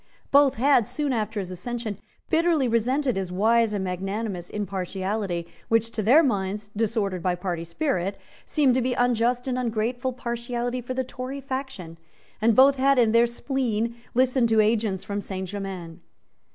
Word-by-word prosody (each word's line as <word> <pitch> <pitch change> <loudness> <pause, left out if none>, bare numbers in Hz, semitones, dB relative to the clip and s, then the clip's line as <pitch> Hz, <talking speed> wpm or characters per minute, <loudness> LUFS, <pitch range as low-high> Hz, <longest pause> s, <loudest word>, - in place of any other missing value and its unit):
Both 280 -1 +5
had, 245 -2 +3
soon 295 -3 -1
after 215 -2 -2
his 185 -2 -5
accession, 215 +2 -5 0.3
bitterly 325 -4 +3
resented 250 +3 +1
his 190 -2 -3
wise 225 +4 +3
and 205 -2 -2
magnanimous 190 0 -3
impartiality, 195 -2 -3 0.2
which, 225 0 +2
to 220 - -2
their 260 +11 +6
minds, 205 -4 -1
disordered 205 -4 -1
by 180 0 0
party 175 -2 -3
spirit, 195 - -2 0.3
seemed 285 -5 +2
to 255 - +2
be 250 0 0
unjust 245 +1 +1
and 255 -1 -1
ungrateful 245 +2 -1
partiality 240 0 -3
for 255 +2 -5
the 260 - 0
Tory 255 +2 -6
faction; 260 -11 -6 0.4
and 225 0 +4
both 275 +2 +6
had, 275 +1 +3
in 230 -3 +4
their 230 +1 +5
spleen, 235 -2 -2 0.2
listened 255 -1 +3
to 220 -1 +3
agents 215 -3 +1
from 205 0 -3
Saint 190 -1 -5
Germains. 185 -4 -6
230 Hz, 160 wpm, -25 LUFS, 195-255 Hz, 0.4 s, their